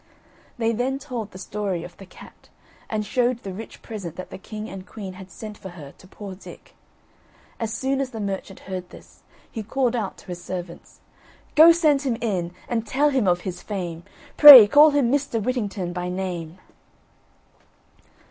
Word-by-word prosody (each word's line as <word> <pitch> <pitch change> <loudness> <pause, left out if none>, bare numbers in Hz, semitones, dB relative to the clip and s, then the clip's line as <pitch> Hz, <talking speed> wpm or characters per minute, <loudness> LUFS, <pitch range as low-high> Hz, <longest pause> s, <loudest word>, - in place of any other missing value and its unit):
They 230 -1 0
then 255 +4 -1
told 250 -7 -6
the 185 - -12
story 195 -3 -4
of 175 - -11
the 195 - -13
cat, - - -16 0.4
and 215 -1 -2
showed 245 0 0
the 195 - -6
rich 220 +4 -10
present 195 -8 -7
that 185 - -9
the - - -8
king 215 +2 -8
and 195 -3 -8
queen 195 -3 -8
had 190 0 -12
sent 210 +1 -10
for 190 - -9
her 150 -6 -11
to 185 - -16
poor 195 0 -9
Dick. 185 - -14 0.9
As 225 -1 -3
soon 265 +4 -1
as 270 - -3
the 225 -3 -8
merchant 195 -1 -5
heard 185 -2 -7
this, - - -16 0.3
he 225 - -5
called 250 +3 -1
out 215 -5 -3
to - - -16
his 175 -1 -8
servants: 175 -2 -8 0.5
"Go 320 +2 +8
send 310 -5 +3
him 255 -5 -1
in, 185 -7 -2 0.2
and 225 -2 -2
tell 290 +6 +2
him 260 -7 +1
of 175 0 +2
his 180 -1 -6
fame; 175 -5 -5 0.4
Pray 280 -7 +12
call 290 +8 +7
him 280 -5 +1
Mr. 280 -4 0
Whittington 205 -6 -3
by 180 0 -4
name." 180 -2 -5
210 Hz, 180 wpm, -23 LUFS, 185-245 Hz, 0.9 s, Pray